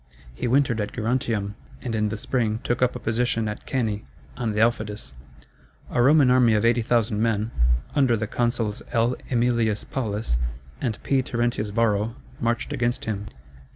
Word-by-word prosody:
He 60 - -3
wintered 125 -3 +2
at 105 - -4
Gerontium, 110 -3 -1 0.3
and 120 -3 -3
in 105 -1 +1
the 110 - -3
spring 110 -1 0
took 120 0 -1
up 125 0 +2
a - - -4
position 115 -1 0
at 105 - -6
Cannæ, 110 -6 -1 0.3
on 115 -3 -1
the 105 - -1
Aufidus. 110 - 0 0.8
A 120 - +2
Roman 140 0 +6
army 125 -3 +5
of 105 +2 +2
80,000 115 -2 +2
men, 110 -1 +1 0.4
under 130 -5 +3
the 110 - -1
consuls 115 -2 -1
L. 120 +1 +2
Æmilius 115 -3 +1
Paulus 110 - -1 0.4
and 110 -4 -1
P. 135 -1 +2
Terentius 120 -4 -1
Varro, 110 +1 +1 0.2
marched 120 0 -1
against 120 +2 -1
him. 105 -2 -3
115 Hz, 155 wpm, -25 LUFS, 105-120 Hz, 0.8 s, Roman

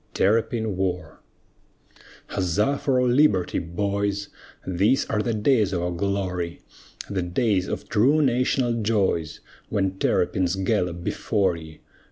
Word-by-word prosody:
TERRAPIN 110 0 +1
WAR 90 -4 -3 1.1
Huzza 105 +10 0
for 130 -3 +1
our 125 - +2
liberty, 120 -8 +3
boys, 100 +3 -2 0.4
These 100 +9 +2
are 105 - +1
the 115 0 -1
days 105 -2 +2
of 85 -1 -1
our 90 - -1
glory 90 -2 -2 0.5
The 100 -2 -2
days 90 +2 0
of - - -5
true 130 +8 +3
national 125 -2 +1
joys, 95 -7 0 0.3
When 95 -2 -1
terrapins 90 0 +1
gallop 90 -3 -1
before 95 -1 0
ye! 80 -1 -11
100 Hz, 125 wpm, -24 LUFS, 90-115 Hz, 1.1 s, liberty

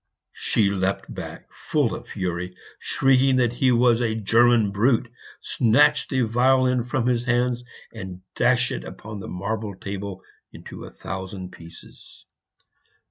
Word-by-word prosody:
She 100 -3 +1
leapt 95 0 -2
back - - -8
full - - 0
of - - -7
fury, 90 0 -4 0.2
shrieking 135 0 +3
that 120 -2 +2
he 130 +1 +2
was 120 -1 +4
a 110 -2 0
"German 115 0 +3
brute," 115 +3 +2 0.3
snatched 145 +5 +3
the 130 -3 +1
violin 125 +2 +3
from 125 0 -1
his 120 -1 +1
hands, 125 0 +1 0.3
and 95 -4 -8
dashed 125 0 +3
it - - -7
on 110 -1 -6
the - - -7
marble 100 +2 -4
table 100 0 -6 0.3
into - - -10
a - - -9
thousand 95 -1 -7
pieces. 85 0 -15
115 Hz, 135 wpm, -24 LUFS, 100-125 Hz, 0.3 s, was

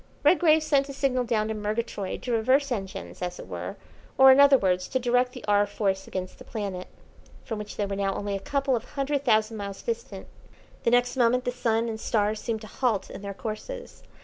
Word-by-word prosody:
Redgrave 315 -3 +5
sent 280 -2 +2
a - - -5
signal 260 -2 0
down 220 -2 0
to - - -1
Murgatroyd 210 -2 -3
to 250 - -3
reverse 260 +5 +2
engines, 195 -6 -5
as 180 0 -3
it - - -8
were, - - -5 0.4
or, 265 0 +9
in 260 - +6
other 280 -1 +8
words, 180 -4 0
to 260 - 0
direct 250 0 +1
the 250 - -9
"R. 205 0 +4
Force" 195 -2 -1
against 185 -1 -5
the - - -10
planet, 200 -5 -5 0.6
from 225 -3 -4
which 210 0 -7
they 205 - 0
were 200 0 -3
now 195 -1 -1
only 205 -1 -2
a - - -2
couple 275 +5 0
of 230 - -3
hundred 280 0 -2
thousand 220 -3 +2
miles 200 -1 -6
distant. 470 0 -4 0.6
The - - +5
next 245 +2 +2
moment 245 +1 +3
the 245 - 0
sun 230 -2 0
and 220 -1 -4
stars 215 -1 0
seemed 225 -2 -3
to 215 - -9
halt 230 -3 -1
in 190 - -8
their 200 -1 -6
courses. 240 - -7
230 Hz, 215 wpm, -26 LUFS, 205-260 Hz, 0.6 s, or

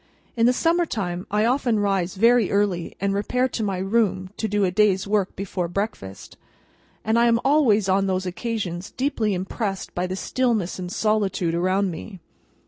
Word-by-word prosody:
In 230 0 +3
the - - +5
summer 335 +6 +1
time, 180 -6 -3
I 210 +1 +1
often 245 -2 +1
rise 195 -3 0
very 230 +1 +4
early, 200 -4 0
and 200 +1 0
repair 250 +6 0
to 235 - -4
my 200 -3 -1
room 190 -1 0
to 220 - -1
do 205 0 0
a 185 - +2
day's 195 -1 +2
work 205 -2 0
before 185 -2 -3
breakfast, 175 - -5 0.7
and 220 +2 +2
I 235 - +4
am 230 0 +3
always 255 -9 +3
on 195 +1 +2
those 185 0 -1
occasions 185 -2 -4
deeply 235 -7 -1
impressed 195 +2 -4
by 180 +1 -1
the 185 - -3
stillness 220 -4 -1
and 180 -1 -5
solitude 200 -5 0
around 185 +3 +1
me. 185 +4 -8
200 Hz, 175 wpm, -23 LUFS, 185-225 Hz, 0.7 s, the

